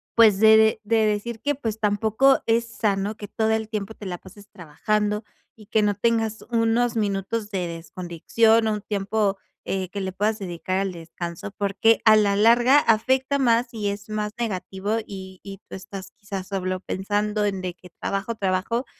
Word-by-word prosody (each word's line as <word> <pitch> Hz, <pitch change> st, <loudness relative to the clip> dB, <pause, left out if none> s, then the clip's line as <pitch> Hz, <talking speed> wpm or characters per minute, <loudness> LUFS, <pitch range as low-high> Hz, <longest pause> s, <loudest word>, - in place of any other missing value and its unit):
pues, 220 Hz, -4 st, +6 dB
de 220 Hz, -, +6 dB
de 220 Hz, 0 st, +3 dB
de 220 Hz, +1 st, +2 dB
decir 215 Hz, +2 st, -2 dB
que 290 Hz, +2 st, 0 dB
pues, 225 Hz, -5 st, -4 dB
tampoco 220 Hz, +5 st, +3 dB
es 230 Hz, +1 st, +2 dB
sano 205 Hz, -2 st, -1 dB
que 205 Hz, -1 st, -8 dB
todo 220 Hz, -1 st, 0 dB
el 220 Hz, -1 st, -1 dB
tiempo 215 Hz, -1 st, -4 dB
te 210 Hz, -, -11 dB
la 180 Hz, -1 st, -4 dB
pases 195 Hz, +3 st, -15 dB
trabajando 210 Hz, +6 st, -2 dB, 0.3 s
y 215 Hz, -2 st, -16 dB
que 220 Hz, -, +2 dB
no 205 Hz, -1 st, +1 dB
tengas 225 Hz, +1 st, 0 dB
unos 230 Hz, +1 st, +1 dB
minutos 205 Hz, +1 st, -2 dB
de 185 Hz, -3 st, -2 dB
desconexión 175 Hz, +7 st, +1 dB
o 215 Hz, -, +1 dB
un 210 Hz, -, -4 dB
tiempo, 205 Hz, 0 st, -1 dB, 0.3 s
eh, 190 Hz, -2 st, -2 dB
que 200 Hz, +2 st, -5 dB
le 190 Hz, 0 st, -3 dB
puedas 210 Hz, +3 st, 0 dB
dedicar 185 Hz, 0 st, -3 dB
al 195 Hz, -1 st, -2 dB
descanso, 170 Hz, +2 st, -7 dB
porque 205 Hz, +3 st, +2 dB
a 220 Hz, -1 st, +8 dB
la 205 Hz, -2 st, +3 dB
larga 240 Hz, +6 st, +6 dB
afecta 260 Hz, +4 st, +2 dB
más 235 Hz, -2 st, +2 dB
y 210 Hz, -2 st, -2 dB
es 200 Hz, +1 st, -6 dB
más 210 Hz, 0 st, -2 dB
negativo 205 Hz, -1 st, -2 dB
y 190 Hz, -1 st, -9 dB
y 195 Hz, -1 st, -9 dB
tú -, -, -7 dB
estás 190 Hz, 0 st, -9 dB
quizá 195 Hz, -2 st, -7 dB
solo 185 Hz, -1 st, -3 dB
pensando 205 Hz, +3 st, -1 dB
en 195 Hz, -2 st, -1 dB
de 180 Hz, -1 st, -4 dB
que 180 Hz, -, -16 dB
trabajo, 210 Hz, +4 st, -2 dB
trabajo 200 Hz, +5 st, -1 dB
210 Hz, 185 wpm, -24 LUFS, 195-225 Hz, 0.3 s, a